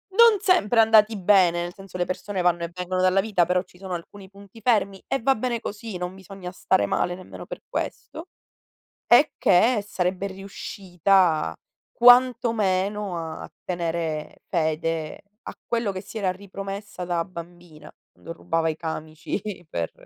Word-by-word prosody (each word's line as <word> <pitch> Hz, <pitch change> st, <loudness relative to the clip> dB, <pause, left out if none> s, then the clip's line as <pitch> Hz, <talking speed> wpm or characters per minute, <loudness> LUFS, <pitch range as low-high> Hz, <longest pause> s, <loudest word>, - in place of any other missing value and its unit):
non 460 Hz, -3 st, +7 dB
sempre 240 Hz, -, +3 dB
andati 220 Hz, -1 st, +5 dB
bene, 180 Hz, -3 st, +4 dB
nel 175 Hz, 0 st, -6 dB
senso 195 Hz, -1 st, -10 dB
le 175 Hz, -, 0 dB
persone 190 Hz, +1 st, -3 dB
vanno 175 Hz, -1 st, +2 dB
e 170 Hz, -, -3 dB
vengono 180 Hz, 0 st, -2 dB
dalla 185 Hz, +1 st, +4 dB
vita, 195 Hz, -5 st, +2 dB
però 180 Hz, +1 st, +1 dB
ci 180 Hz, -, -22 dB
sono 190 Hz, -2 st, -4 dB
alcuni 190 Hz, +3 st, -10 dB
punti 200 Hz, +2 st, -15 dB
fermi, 200 Hz, -4 st, +1 dB
e 270 Hz, -, 0 dB
va 270 Hz, -, +5 dB
bene 235 Hz, 0 st, -2 dB
così, 210 Hz, -2 st, -6 dB
non 180 Hz, +1 st, -4 dB
bisogna 190 Hz, -1 st, -9 dB
stare 100 Hz, -, +1 dB
male 175 Hz, -, 0 dB
nemmeno 185 Hz, -, -10 dB
per -, -, -8 dB
questo. 320 Hz, +4 st, -5 dB, 0.8 s
E 280 Hz, +6 st, +6 dB
che, 210 Hz, +3 st, +4 dB
sarebbe 185 Hz, 0 st, -1 dB
riuscita 190 Hz, -, 0 dB, 0.4 s
quanto 245 Hz, -1 st, +6 dB
meno, 200 Hz, -1 st, 0 dB
a 160 Hz, -1 st, -6 dB
tenere 165 Hz, -3 st, -3 dB
fede 160 Hz, -1 st, -1 dB, 0.2 s
a -, -, -8 dB
quello 230 Hz, -3 st, 0 dB
che 185 Hz, -, -5 dB
si 210 Hz, +3 st, -8 dB
era 190 Hz, -3 st, 0 dB
ripromessa 195 Hz, 0 st, -7 dB
da 175 Hz, -1 st, -1 dB
bambina, 170 Hz, -3 st, -11 dB, 0.2 s
quando 165 Hz, -, -9 dB
rubava 165 Hz, -1 st, -1 dB
i 155 Hz, -, -4 dB
camici 160 Hz, +2 st, -5 dB, 0.3 s
per 85 Hz, -1 st, -3 dB
185 Hz, 155 wpm, -24 LUFS, 175-210 Hz, 0.8 s, non